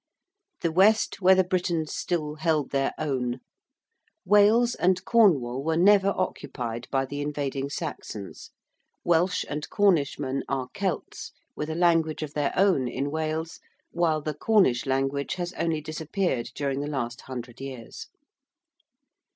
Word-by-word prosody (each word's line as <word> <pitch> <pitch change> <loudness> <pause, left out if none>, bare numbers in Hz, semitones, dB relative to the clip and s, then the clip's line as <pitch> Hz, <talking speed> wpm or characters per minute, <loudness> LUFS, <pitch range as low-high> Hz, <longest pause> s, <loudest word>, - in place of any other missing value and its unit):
~The 170 - 0
West 200 +5 +3
where 190 +1 +6
the 185 - +4
Britons 175 -4 -1
still 155 -4 -2
held 155 -3 0
their 135 -1 +1
own~: 130 -4 -2 0.9
Wales 210 +5 +5
and 185 +1 +1
Cornwall 140 - +3
were 160 +1 0
never 200 +2 +5
occupied 120 -9 -4
by 135 -1 0
the 145 +2 -5
invading 140 -2 -3
Saxons: 140 - -6 0.5
Welsh 175 +2 +2
and 150 +1 -5
Cornishmen 145 -8 +1
are 130 -2 -2
Celts, 195 -3 -4 0.2
with 150 - -4
a 160 - -3
language 165 -3 +2
of 150 -1 -6
their 145 -1 0
own 185 -10 +3
in 135 +3 -3
Wales, 160 +1 -3 0.3
while 165 -3 +1
the 155 +1 -3
Cornish 150 - +2
language 135 +1 -1
has 175 -1 -4
only 165 -2 -1
disappeared 155 - -2
during 140 -1 -2
the 145 - -3
last 125 -5 -3
hundred 125 -1 -7
years. 130 -4 -8
155 Hz, 135 wpm, -26 LUFS, 135-180 Hz, 0.9 s, where